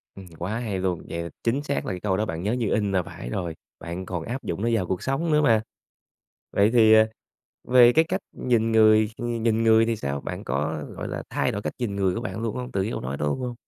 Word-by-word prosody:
Ừm, 95 -1 -10
quá 105 +7 -3
hay 105 -6 -3
luôn. 90 -3 -1
Vậy 85 0 -4
chính 130 +5 0
xác 140 -1 -2
là - - -2
cái 90 - -5
câu 95 -1 0
đó 110 - 0
bạn 80 -2 -4
nhớ 105 +3 0
như 120 -4 -1
in 105 -2 +1
là 95 -2 +1
phải - - -8
rồi, 85 +1 -3 0.2
bạn 85 +2 -6
còn 90 -3 -4
áp 130 +4 -5
dụng 85 +4 -4
nó 115 - +1
vào 100 -5 +1
cuộc 95 - -2
sống 155 +5 -1
nữa 150 0 +4
mà. 115 -6 +4 0.9
Vậy 105 +3 +3
thì, 110 -2 +6
ờ, 110 0 +6 0.6
về 125 -1 +7
cái 160 +4 +4
cách - - -2 0.2
nhìn 115 -2 +1
người 110 -1 +5
ờ, 120 - -3
nhìn 115 -1 0
người 110 0 +5
thì 115 -1 0
sao? 70 -4 -3
Bạn - - -6
có, 75 +3 -2
gọi - - -5
là, - - -4
thay - - 0
đổi 100 - -4
cách - - -3
nhìn 105 -5 -2
người 95 -2 +1
của - - -3
bạn 120 -2 -5
luôn 115 +1 -2
hông 125 0 -5
từ 95 - 0
cái 105 - -2
câu - - -3
nói 70 +2 -4
luôn 75 - -1
hông? 125 -1 -3
110 Hz, 265 wpm, -25 LUFS, 90-120 Hz, 0.9 s, về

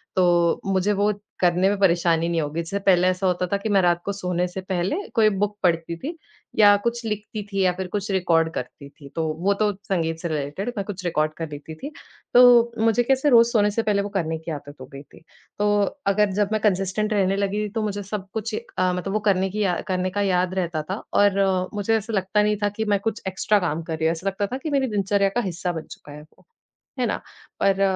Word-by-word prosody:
तो 175 -2 +3
मुझे 195 +1 +1
वो 205 +1 +2 0.3
करने 180 +1 +3
में 205 - 0
परेशानी 170 -3 +3
नहीं 170 -1 0
होगी। 150 +2 -3
जिससे 170 +4 -4
पहले 185 -2 +3
ऐसा 185 +1 +1
होता 180 0 0
था - - +3
कि 200 +2 -4
मैं 200 -2 +4
रात 175 -1 +2
को 200 - -1
सोने 180 -2 -1
से 180 +2 -6
पहले 185 +3 -1 0.2
कोई 220 -2 +5
बुक 205 +1 -2
पढ़ती 170 -1 +1
थी 300 - -6 0.4
या 205 -1 +8
कुछ 235 0 -1
लिखती 210 0 -4
थी 195 0 0
या 185 - +4
फिर 190 - -3
कुछ 205 +1 -3
रिकॉर्ड 170 -4 +2
करती 135 +2 -6
थी। 140 -1 -15
तो 165 - -1 0.2
वो 200 - +4
तो 210 -1 +3
संगीत 165 -4 -1
से 170 - -3
रिलेटेड, 155 +8 -3
मैं 200 - -2
कुछ 195 -2 -6
रिकॉर्ड 155 -2 0
कर 165 -2 -4
लेती 150 +2 -8
थी। 280 - -7 0.4
तो, 240 -1 +7
मुझे 225 +2 +3
कैसे 270 +3 +2
रोज 235 -3 +7
सोने 210 -3 +2
से 225 +2 -1
पहले 205 -2 +1
वो 200 - -4
करने 165 -5 -2
की 160 +1 -7
आदत 145 -1 -7
हो - - -7
गयी 140 +1 -9
थी। - - -19 0.4
तो, 205 0 +3 0.3
अगर 200 0 +3
जब 205 -1 +2
मैं 215 -1 0
कंसिस्टेंट 205 +1 0
रहने 195 -2 +2
लगी 200 +1 -1
थी, - - -5
तो 220 +2 -3
मुझे 205 -1 -3
सब 195 0 -5
कुछ 220 0 -3
अ, 185 -3 -1
मतलब 180 +2 -3
वो 215 - +1
करने 190 -1 +2
की 210 +2 -2
अ, 180 -3 0
करने 185 0 0
का 205 +2 -2
याद 185 -2 +1
रहता 170 -4 -1
था। 200 - -4 0.2
और 200 -1 +2 0.3
मुझे 210 +2 +1
ऐसा 220 +1 -5
लगता 195 +1 +1
नहीं 210 0 +1
था, 205 - +3
कि 220 +2 -4
मैं 205 -2 +2
कुछ 225 +2 -3
एक्स्ट्रा 190 +2 +1
काम 165 -3 -2
कर 160 -1 -4
रही 160 - -2
हूँ। - - +3
ऐसा 170 +4 -5
लगता 195 +1 -1
था - - -1
कि 315 - -2
मेरी 275 -2 +1
दिनचर्या 200 -2 +1
का 240 - +2
हिस्सा 175 +1 -3
बन 160 -2 -5
चुका 145 - -11
है 150 +1 -10
वो। 155 - -22 0.5
है - - +2
ना। - - -2 0.4
पर 195 0 +2
195 Hz, 240 wpm, -23 LUFS, 175-210 Hz, 0.5 s, या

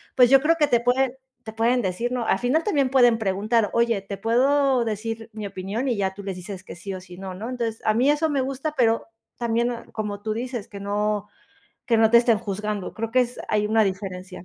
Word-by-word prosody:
pues 250 -1 +6
yo 270 0 +7
creo 330 +2 +3
que 295 - +4
te 240 -4 +3
pueden 250 +1 +2 0.3
te 220 0 -8
pueden 235 +2 +2
decir, 215 +6 -2
¿no?, 245 -2 -1
al - - +3
final 275 +7 +1
también 280 -10 +2
pueden 245 -3 +5
preguntar: 210 +2 +1
"Oye, 235 -3 +2
te 195 0 -7
puedo 260 +2 +2
decir 225 +1 -4
mi 215 -1 -6
opinión", 200 +7 -4
y 240 - +1
ya 190 -1 -1
tú 200 - -9
les 195 -2 -4
dices 185 +1 -8
que - - -9
sí, 190 +3 -6
o 185 - -5
si, 180 -1 -13
no, 190 -1 -6
¿no? 210 +5 -6
Entonces, 230 -3 -3
a 215 - +3
mí 250 +5 +3
eso 310 +2 +1
me 280 -2 +1
gusta, 275 +3 -3
pero 230 -4 +2 0.3
también 235 0 0
no, 235 -1 -6
como 210 -2 -4
tú 215 0 -2
dices, 240 -2 -4
que 200 - -9
no 210 0 -1 0.6
que 230 - +3
no 220 0 +4
te 235 - +8
estén 235 -3 +3
juzgando. 205 0 -4
Creo 225 0 -4
que 255 - +5
es 245 0 -2
hay 210 0 +1
una 220 0 +4
diferencia. 185 -1 -5
225 Hz, 235 wpm, -24 LUFS, 205-245 Hz, 0.6 s, te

